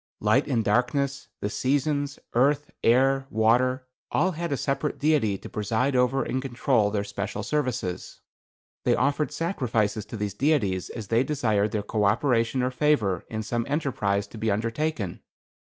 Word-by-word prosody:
Light - - +2
and 115 -2 0
darkness, 135 +5 0
the 105 - -1
seasons, 145 +2 0 0.2
earth, 140 +4 +2
air, 135 +3 +3
water, 125 +4 +2 0.2
all 185 +4 +2
had 170 -1 -4
a 140 - 0
separate 140 +2 -1
deity 140 -10 +2
to - - -10
preside 115 +6 -1
over 125 +2 +2
and 130 - -2
control 120 -4 +1
their 100 -1 -1
special 100 0 -4
services. 125 -9 -3 0.6
They - - +3
offered 140 +3 +1
sacrifices 115 - -1
to 110 - -7
these 105 -2 -3
deities 105 - +1
as 110 -4 -7
they 115 +2 +3
desired 110 -9 +1
their 105 -2 -1
co 105 0 0
operation 115 +3 +2
or 125 - 0
favor 125 - +1
in 110 0 -3
some 120 +1 -1
enterprise 115 -9 0
to 110 - -10
be 110 0 0
undertaken. 115 - -2
125 Hz, 155 wpm, -26 LUFS, 105-140 Hz, 0.6 s, air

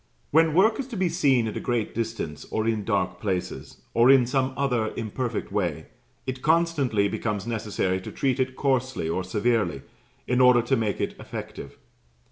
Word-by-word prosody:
When 160 0 +4
work 215 +7 +4
is 270 - -3
to 235 -5 -6
be 185 -2 +1
seen 135 -9 +2
at 110 - -5
a - - -2
great 120 -3 -1
distance, 115 -10 -4
or 110 - -2
in 110 -2 0
dark 95 -4 -1
places, 95 -4 -4
or 120 +2 +5
in 135 -2 +7
some 130 +1 0
other 125 -6 0
imperfect 115 0 -3
way, 90 -7 -2 0.4
it 130 -1 -4
constantly 150 -10 +2
becomes 105 -1 -3
necessary 105 -5 -1
to - - -8
treat 135 -1 0
it 130 0 0
coarsely 130 - 0
or 85 +3 -1
severely, 100 - 0 0.4
in 125 +1 +1
order 125 -2 +6
to 135 +3 +1
make 110 -4 -1
it - - -1
effective. - - -8
120 Hz, 175 wpm, -25 LUFS, 105-135 Hz, 0.4 s, in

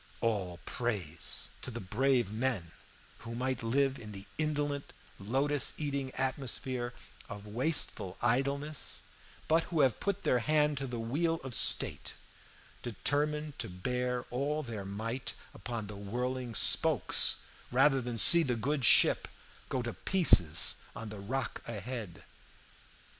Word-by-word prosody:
All 95 -6 -1
praise 100 -10 -2
to - - -1
the 120 -1 -6
brave 120 +1 +1
men 110 -8 -1 0.5
who 115 0 -7
might 130 0 -2
live 135 +4 +1
in 105 -2 -9
the 100 0 -9
indolent 145 -2 -2 0.3
lotus 135 +7 0
eating 140 -3 -2
atmosphere 130 -2 -3 0.3
of 105 0 -8
wasteful 110 - +2
idleness, 140 +5 -1 0.4
but 165 +1 +3
who 165 -4 0
have 130 -5 +2
put 200 -1 -2
their 125 - +2
hand 150 +2 +2
to 135 - -4
the 120 -1 -5
wheel 155 +9 -1
of 135 -2 -6
state, - - +1 0.7
determined 150 +6 -1
to - - -2
bear 125 +6 -2
all 145 +5 -1
their 110 -6 -6
might 115 +6 -4 0.2
upon 115 -3 -5
the 105 0 -8
whirling 120 +4 -4
spokes - - +3 0.4
rather 135 +2 +4
than 120 -1 -4
see 170 +9 +7
the 125 -7 0
good 135 +5 -1
ship - - +5 0.4
go 125 - -1
to 120 - -4
pieces 90 - +6 0.2
on 110 +1 -6
the 105 -1 -8
rock 115 +4 -4
ahead. 110 -5 -6
125 Hz, 135 wpm, -31 LUFS, 110-140 Hz, 0.7 s, see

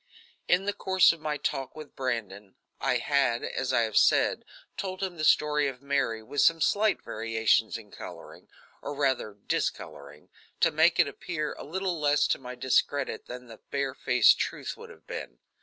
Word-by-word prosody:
In 180 +2 +3
the 205 - 0
course 190 -4 +4
of 165 - -11
my 150 -1 -2
talk 135 -2 -3
with 155 -2 -11
Brandon 105 -6 -4 0.2
I 125 -2 +1
had, 120 -1 +1
as 130 0 -2
I 120 - +3
have 110 -2 -2
said, - - +3 0.3
told 190 0 -4
him 185 -2 -3
the 155 - -4
story 150 -1 +3
of 130 -2 -5
Mary, 135 -6 -1
with 145 +6 -1
some 165 0 +4
slight 205 +6 +2
variations 110 0 +1
and 105 -3 -14
coloring, - - -10 0.3
or 145 - -5
rather 130 -7 0
discoloring, 70 +1 -4 0.3
to 165 - +4
make 160 +3 +3
it - - +5
appear 155 -4 -4
a - - -10
little 185 +1 -3
less 145 0 +3
to - - +1
my 125 -1 -8
discredit 130 +2 0
than 125 0 -8
the 115 -2 -13
barefaced 140 -2 +3
truth - - -3
would - - -12
have - - -16
been. - - -7
140 Hz, 175 wpm, -28 LUFS, 115-155 Hz, 0.3 s, it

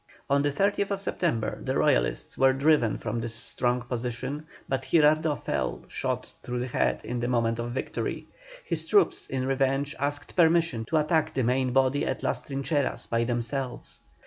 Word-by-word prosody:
On 140 0 +4
the 145 - +2
30th 200 +4 +1
September 160 - -1
the - - -1
Royalists - - +1
were 135 0 +4
driven 140 -4 +3
from 115 +1 -3
this 115 0 -4
strong 125 +1 -1
position, 125 +5 -4 0.2
but 135 0 -1
Girardot 155 -3 +3
fell, - - -2
shot - - -3
through 125 0 -4
the 125 - -2
head 125 - 0
in 120 +1 -3
the 120 - -1
moment 115 -2 +1
of 120 0 -2
victory. 125 +2 -3 0.4
His - - -1
troops, 405 -2 +3
in 130 -1 -2
revenge, 135 +2 0
asked 145 +1 -3
permission 165 -8 +3
to 160 - +1
attack 155 0 +1
the 130 - +1
main 130 +2 +1
body 135 +2 +2
at - - -2
Las - - 0
Trincheras 140 0 -1
by 115 0 +2
themselves. 120 +2 -3
135 Hz, 170 wpm, -27 LUFS, 120-150 Hz, 0.4 s, On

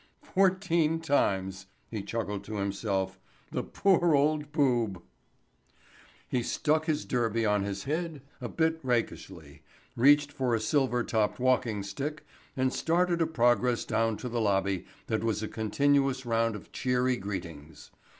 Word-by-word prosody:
"Fourteen 185 -4 +2
times," 95 -11 0 0.2
he 110 -3 -3
chuckled 105 -1 -4
to 110 - -6
himself. 100 -1 -2 0.3
"The - - -1
poor 175 -5 +3
old 150 +1 +1
boob." 120 - +1 1.3
He 125 - 0
stuck 155 +6 0
his 155 -1 0
derby 115 -2 0
on 105 -1 +2
his 100 0 -3
head 155 -1 -3 0.2
a - - -4
bit 160 0 0
rakishly, 115 - -3 0.3
reached 145 +3 +5
for 130 -4 0
a - - 0
silver 125 +2 +1
topped 110 -1 0
walking 125 -5 +1
stick 140 +10 -5 0.3
and 130 0 +1
started 170 +1 +1
a 165 - +3
progress 120 -4 +2
down 115 -1 0
to 125 - -6
the 120 -1 -1
lobby 95 -3 0 0.2
that 110 -1 -1
was 110 -2 -1
a - - -2
continuous 135 +4 +1
round 115 -1 +1
of 105 - -11
cheery 125 0 +1
greetings. 85 -6 -7
120 Hz, 140 wpm, -29 LUFS, 105-145 Hz, 1.3 s, reached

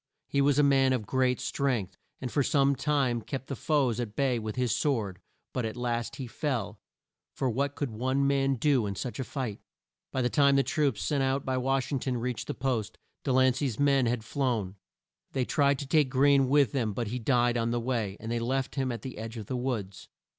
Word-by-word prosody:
He 140 - +1
was 140 0 +3
a 150 - +5
man 135 -2 +4
of 115 -5 -1
great 130 +3 +1
strength, 125 -9 -1 0.2
and 125 -2 -4
for 145 - +2
some 140 0 +3
time 135 -4 +1
kept 135 +3 -5
the 140 - -4
foes 130 -5 +1
at 115 -4 -4
bay 130 -4 +1
with 110 -1 -5
his 125 -3 +1
sword, 110 -10 -1 0.3
but 125 - -1
at 110 +1 -4
last 120 +1 -2
he 135 -2 -5
fell, 115 -5 -3 0.6
for 130 -2 0
what 140 +4 -1
could 140 -5 -3
one 130 +5 0
man 135 -1 +2
do 130 -3 +2
in 100 - -3
such 120 +3 -5
a - - 0
fight? 125 -6 -4 0.5
By 130 - 0
the - - +3
time 140 -2 +4
the 135 - +4
troops 140 -3 0
sent 145 -3 0
out 135 +1 0
by 130 -1 0
Wash 135 +1 0
ing 140 - 0
ton 125 -1 -2
reached 120 0 -3
the - - -3
post, 115 -5 -2 0.3
De 135 - 0
lan 130 0 +4
cey's 130 -4 -2
men 140 -3 +3
had 115 -1 -1
flown. 115 -7 -1 0.6
They 130 -2 0
tried 140 0 +2
to 140 - -5
take 150 -1 +3
Greene 135 0 +4
with 140 -5 +4
them, 115 -6 -1
but 115 +1 -3
he 125 +3 -3
died 120 0 +2
on 115 -1 0
the 120 0 0
way, 115 -5 -2
and 115 +1 -5
they 120 - 0
left 130 +3 -1
him 135 -2 -1
at 115 -3 -6
the 130 -4 -7
edge 115 +1 -6
of 110 - -6
the 130 - -4
woods. 120 -7 -4
130 Hz, 225 wpm, -29 LUFS, 115-140 Hz, 0.6 s, a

